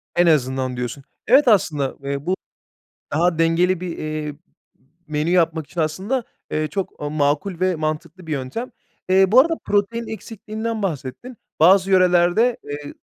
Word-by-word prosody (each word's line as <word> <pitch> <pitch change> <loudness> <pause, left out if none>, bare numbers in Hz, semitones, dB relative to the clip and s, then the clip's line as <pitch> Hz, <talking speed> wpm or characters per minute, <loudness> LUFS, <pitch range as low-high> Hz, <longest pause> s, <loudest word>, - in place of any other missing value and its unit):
En 175 0 +4
azından 130 -4 +1
diyorsun. 125 +3 -4 0.2
Evet 265 +4 +6
aslında, 155 - +2
eee, 140 +1 -3
bu 185 +2 +1 0.8
daha 165 +2 +1
dengeli 170 +2 +2
bir, 180 -2 -5
eee, 155 0 -4
m 145 - -16 0.7
menü 155 +1 -1
yapmak 165 -3 +2
için 175 - -2
aslında, 190 +12 -1 0.3
eee, 155 0 0
çok 195 +1 -5
makul 150 +5 0
ve 185 -1 +1
mantıklı 155 +3 -4
bir - - -5
yöntem. 150 - -4 0.4
Eee, 190 0 +4
bu 245 - +8
arada 330 +5 +4
protein 215 +3 0
eksikliğinden 220 +1 -5
bahsettin. 185 - -5 0.2
Bazı 185 +4 +5
yörelerde, 185 +5 +4
eee, 145 0 -7
175 Hz, 145 wpm, -21 LUFS, 150-200 Hz, 0.8 s, bu